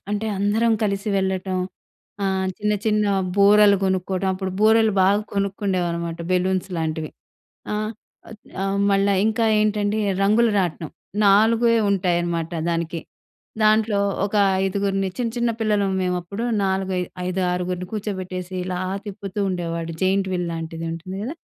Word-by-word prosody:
అంటే 210 +1 -1
అందరం 215 +4 +2
కలిసి 200 0 -1
వెళ్ళటం, 190 -1 -1 0.7
ఆహ్, 190 -1 0
చిన్న, 210 0 0
చిన్న 210 -1 +2 0.3
బూరలు 205 0 +6
కొనుక్కోవటం. 190 0 0
అప్పుడు 190 0 -4
బూరలు 220 0 +5
బాగా 200 +2 +4
కొనుక్కుండేవారు 190 -3 -1
మాట, 165 0 -6
బెలూన్స్ 185 +1 +1
లాంటివి. 160 -1 -2 0.6
ఆహ్, 215 +1 -2 0.7
ఆహ్, 195 0 -1
మళ్ళా 200 0 +3
ఇంకా 220 +1 +1 0.2
ఏంటండి, 210 0 +1 0.2
రంగుల 215 +4 +4
రాట్నం. 170 -4 -2 0.4
నాలుగే 225 +4 +4 0.2
ఉంటాయనమాట 175 -3 0 0.2
దానికి. 165 0 -2 0.6
దాంట్లో 215 -1 +3 0.3
ఒక 205 - -8 0.3
ఐదుగురిని 195 0 0
చిన్న, 240 -2 0
చిన్న 240 -1 +1
పిల్లలం 205 -3 +1
మేవప్పుడు. 180 +4 -2 0.2
నాలుగై 190 -1 0 0.3
ఐదారుగురుని 180 0 -1
కూర్చోబెట్టేసి 185 -3 -4
ఇలా 180 -1 -3 0.3
తిప్పుతూ 200 0 -5
ఉండేవాడు. 170 -2 -3
జెయింట్ 190 +1 +2
వీల్ 175 -1 -1
లాంటిది 165 0 -5
ఉంటుంది 175 +3 -7
గదా! 260 +8 -4
195 Hz, 125 wpm, -22 LUFS, 180-210 Hz, 0.7 s, బూరలు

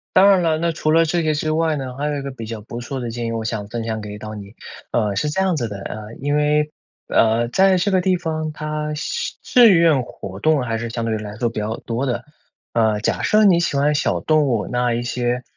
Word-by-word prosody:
当 190 +2 +7
然 195 -2 +5
了， 160 -2 +2
那 170 +1 0
除 155 -1 -1
了 165 +1 +5
这 170 +2 0
个 155 -1 +1
之 155 +1 -1
外 160 0 +1
呢， 130 -3 -5
还 145 +3 -2
有 150 -1 -1
一 - - -4
个 140 0 -5
比 115 -3 -8
较 110 -1 -6
不 115 +3 -7
错 130 +3 -5
的 120 -2 -4
建 120 0 -4
议， - - -2
我 115 -1 -3
想 110 -2 -3
分 115 +2 -4
享 110 -1 -3
给 105 0 -7
到 110 +1 -7
你。 100 0 -10 0.4
呃， 105 -4 0
是 150 +10 0
这 150 - -2
样 190 -2 +2
子 120 -6 -1
的， 100 -2 -7
啊， - - -5 0.3
因 145 +1 0
为， 150 0 +2 0.4
呃， 115 +1 +3
在 190 +6 +4
这 180 +3 +1
个 185 -1 +3
地 185 0 +2
方 155 -2 -3
它 150 0 -4
相 475 - -3
志 245 -3 +6
愿 165 -6 +4
活 100 -5 -8
动 150 +2 +2
还 115 -2 -2
是 115 0 -4
相 115 0 -3
对 115 - -1
于 - - 0
来 105 -1 -7
说 120 +1 0
比 115 - -5
较 110 +2 -3
多 120 +3 -3
的。 120 -1 -2 0.5
呃， 110 -2 +2
假 - - 0
设 215 0 +4
你 185 -5 +5
喜 170 -4 0
欢 145 +2 +3
小 145 - 0
动 155 -2 +2
物， 115 -5 0
那 125 -1 +1
一 120 +1 -2
些， 120 0 -1
135 Hz, 280 characters per minute, -21 LUFS, 115-155 Hz, 0.5 s, 当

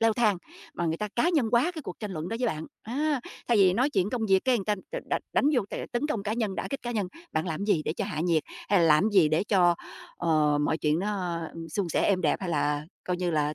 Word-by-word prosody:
leo 225 -1 +4
thang, 215 -5 +2 0.4
mà 170 - -1
người 160 - 0
ta 210 +4 -3
cá 280 +8 +3
nhân 295 -10 +2
hóa 245 +9 +4
cái 315 - -6
cuộc 185 - -7
tranh 210 -3 -4
luận 160 +1 -4
đó 225 - -2
với 250 - +2
bạn, 160 -7 -3 0.2
á, 285 +4 -1 0.3
thay 235 - +4
vì 190 -3 +6
nói 255 +8 +2
chuyện 195 -4 +1
công 240 -3 -2
việc 190 -1 +5
cái 260 -2 +4
người 200 - -4
ta 210 +1 +1 0.2
đ - - -3
đ - - +2 0.2
đánh - - +2
vô 245 - +3
cái - - -4
tấn 240 +5 0
công 230 -10 -2
cá 210 - -2
nhân, 220 -4 -1
đả - - -3
kích 275 - -4
cá 240 - -3
nhân, 210 -5 -1 0.3
bạn 160 +3 -1
làm 165 +3 -3
gì 205 -7 +2
để - - -1
cho 200 - -3
hạ 190 -6 -3
nhiệt? 165 -2 +2 0.3
Hay 200 - +4
là - - +4
làm 155 +7 +5
gì 190 -7 +5
để 155 +5 +1
cho, 180 -4 +4 0.4
ờ, 155 -3 +2
mọi 155 +2 +1
chuyện 150 +1 +1
nó, 185 -4 -2 0.2
ừm, 165 0 -7
suôn 180 +3 -2
sẻ, - - +1
êm 195 -3 +2
đẹp 155 -5 +2
hay 190 - -3
là 145 -2 0 0.2
coi 180 - -1
như 180 -1 -1
là 150 -2 0
190 Hz, 290 wpm, -27 LUFS, 165-225 Hz, 0.4 s, vì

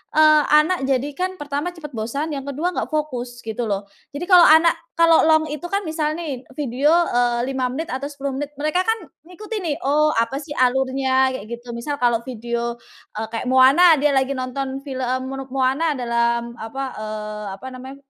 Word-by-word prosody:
eee, 310 -1 +6 0.2
anak 355 +4 +1
jadi 270 +1 0
kan, 370 +1 0
pertama 290 +4 -3
cepet 300 -3 -8
bosan, 275 +8 -3
yang 275 0 -6
kedua 300 +6 -1
nggak - - -2
fokus, 250 -5 -3
gitu 225 +2 -4
loh. 200 0 -2 0.3
Jadi, 295 +5 -5
kalau 355 -2 +8
anak 320 +2 +6 0.2
kalau 330 -1 +6
long 315 0 +4
itu 300 +3 -6
kan, 400 +1 +1
misal 310 -1 -1
nih 275 -6 -5
video, 280 +3 +1 0.2
eee, 240 0 +1
5 260 -1 -1
menit 320 +4 -4
atau 265 +2 -3
10 280 -1 -4
menit, 290 0 -4
mereka 310 +5 +1
kan 450 0 +1 0.3
ngikutin 420 +4 -6
nih, 295 -3 0
"Oh, 305 +2 +3
apa 230 +4 0
sih 295 0 -7
alurnya," 260 +1 +2
kayak 215 -5 -6
gitu. 240 +1 -8
Misal 260 +5 -3
kalau 240 -2 +2
video, 235 0 -3 0.4
eee, 220 0 -3
kayak 230 - -3
Moana, 275 +7 +6
dia 290 +1 +2
lagi 265 0 +1
nonton 265 +1 -4
film 260 -1 -2
mono 270 -1 -6
Moana 270 +4 +1
dalam 235 -1 0
apa, 225 +5 -6 0.2
eee, 215 0 -5
apa 260 - -13
namanya, 260 +2 -9
270 Hz, 185 wpm, -21 LUFS, 245-305 Hz, 0.4 s, kalau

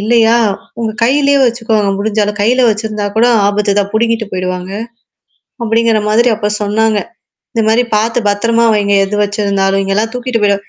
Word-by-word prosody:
இல்லையா 225 +1 +3 0.5
உங்க 225 - -1
கையிலயே 280 +3 +2
வச்சுக்கோங்க. 225 -4 0
முடிஞ்சாலும் 210 0 -1
கையில 250 +4 +2
வச்சிருந்தா 215 -1 -3
கூட 235 +2 +4 0.2
ஆபத்து 205 0 0
தான் 200 - -3
புடுங்கிட்டு 230 0 0
போயிடுவாங்க. 185 0 -4 0.9
அப்படிங்கிற 225 -1 +1
மாதிரி 235 +3 +3
அப்ப 210 -1 -2
சொன்னாங்க. 215 +1 +1 0.6
இந்த 230 - 0
மாரி 230 +3 +3
பார்த்து 225 +3 0
பத்திரமா 230 +3 +1
வைங்க 205 -1 +1
எது 210 - -4
வச்சிருந்தாலும் 200 -1 0
இங்கல்லாம் 210 +3 -1
தூக்கிட்டு 250 -1 -2
போயிட 200 -1 +3
220 Hz, 145 wpm, -13 LUFS, 205-230 Hz, 0.9 s, கூட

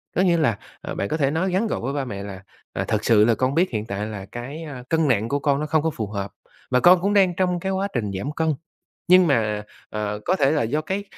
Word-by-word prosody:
Có - - +3
nghĩa 175 -3 +3
là, 125 -10 +2 0.2
à, - - -5
bạn 100 - -2
có 155 - -1
thể 140 -2 +1
nói 180 +4 0
ngắn 195 +5 +1
gọi - - -2
với 135 +4 -2
ba 140 -2 -2
mẹ 100 -4 -6
là, 100 -1 -8 0.3
à, - - -2
"Thật 110 0 -1
sự 105 -2 +5
là 115 0 +3
con 130 +4 0
biết 180 +3 +3
hiện 110 -3 -2
tại 105 -1 -3
là 105 -3 -6
cái, 135 +7 -6
a, 140 -6 -8
cân 160 -1 +2
nặng 115 -3 +1
của 145 - 0
con 140 0 +1
nó 150 - -2
không 155 0 +2
có 160 - +2
phù 110 -9 -4
hợp 100 -1 -4 0.4
và 125 - +4
con 175 +4 +6
cũng 200 +2 +1
đang 190 -3 +4
trong 180 -1 +1
cái 190 +3 -2
quá 195 +1 0
trình 105 -5 -1
giảm 135 +10 -3
cân, 160 0 0 0.6
nhưng 185 0 +7
mà, 105 -7 +1 0.3
ờ, 105 -1 -3
có 185 - +2
thể 135 -4 +3
là 150 -4 +2
do 140 +7 0
cái 190 +5 -3
140 Hz, 280 wpm, -23 LUFS, 110-170 Hz, 0.6 s, nhưng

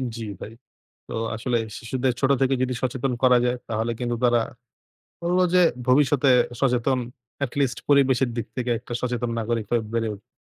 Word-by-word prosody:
জি 115 - -5 0.2
ভাই। 110 - -7 0.6
তো - - -9 0.2
আসলে 120 +2 -1 0.2
শিশুদের 125 +2 -1
ছোট 135 - +2
থেকে 135 0 +3
যদি 130 0 0
সচেতন 130 0 -1
করা 125 -1 +6
যায় 125 0 +1
তাহলে 115 +1 -1
কিন্তু 120 -1 -1
তারা 120 -1 +4 0.8
বলব 175 +2 +1 0.2
যে 180 - +6 0.3
ভবিষ্যতে 140 +1 +4 0.3
সচেতন 130 0 +2 0.5
at 125 - -4
least 135 -3 +1
পরিবেশের 135 -3 +4
দিক 115 - -2
থেকে 125 -1 -2
একটা 120 +1 -10
সচেতন 120 -1 -2
নাগরিক 115 -1 -2
হয়ে 120 -2 +2
বেড়ে 115 -1 0
উঠবে। 100 - -16
125 Hz, 165 wpm, -24 LUFS, 120-135 Hz, 0.8 s, করা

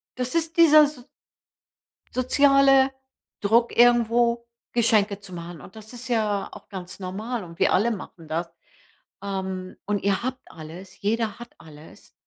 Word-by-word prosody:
das 250 +3 -3
ist 330 -1 -1
dieser 310 -2 +8
s 290 -3 -4 1.1
soziale 270 +1 +4 0.5
Druck, 230 +3 +2
irgendwo 235 0 +3 0.3
Geschenke 215 -4 +2
zu 195 -2 -11
machen. 170 -3 -8
Und 190 - -14
das 220 +2 -12
ist 245 +1 -9
ja 215 -4 0
auch - - -13
ganz 185 -1 -8
normal 210 +4 -4
und 170 -1 -13
wir - - +3
alle 230 +5 +2
machen 180 -5 -8
das. 165 +2 -2 0.8
Ähm, 190 -2 -5
und 205 -1 -1
ihr 200 +2 0
habt 255 0 -3
alles, 170 +4 -11
jeder 220 +1 -1
hat 240 0 -11
alles. 155 -1 -16
220 Hz, 145 wpm, -24 LUFS, 190-245 Hz, 1.1 s, dieser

